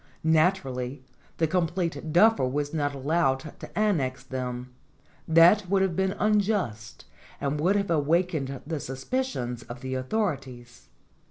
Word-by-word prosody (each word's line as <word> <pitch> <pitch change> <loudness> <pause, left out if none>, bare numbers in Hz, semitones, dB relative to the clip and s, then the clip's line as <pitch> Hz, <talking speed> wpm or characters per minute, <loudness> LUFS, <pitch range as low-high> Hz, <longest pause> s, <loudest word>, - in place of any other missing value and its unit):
Naturally, 145 -6 +1 0.3
the 165 - +2
com 170 +1 +1
plete 170 -2 -3
duffer 210 -1 +5
was 145 +3 -2
not 145 -2 -1
allowed 135 -1 +1 0.2
to - - -10
annex 155 -12 0
them; 125 -1 -5 0.5
that 175 +4 +6
would 195 0 +3
have 185 -3 0
been 190 +1 +1
unjust 205 - 0 0.3
and 140 +1 -1
would 185 +5 +3
have 200 -3 0
awakened 155 -3 0
the 160 0 -3
suspicions 135 - -3
of 120 +2 -10
the 130 0 -4
authorities. 130 - -3
155 Hz, 135 wpm, -27 LUFS, 130-185 Hz, 0.5 s, that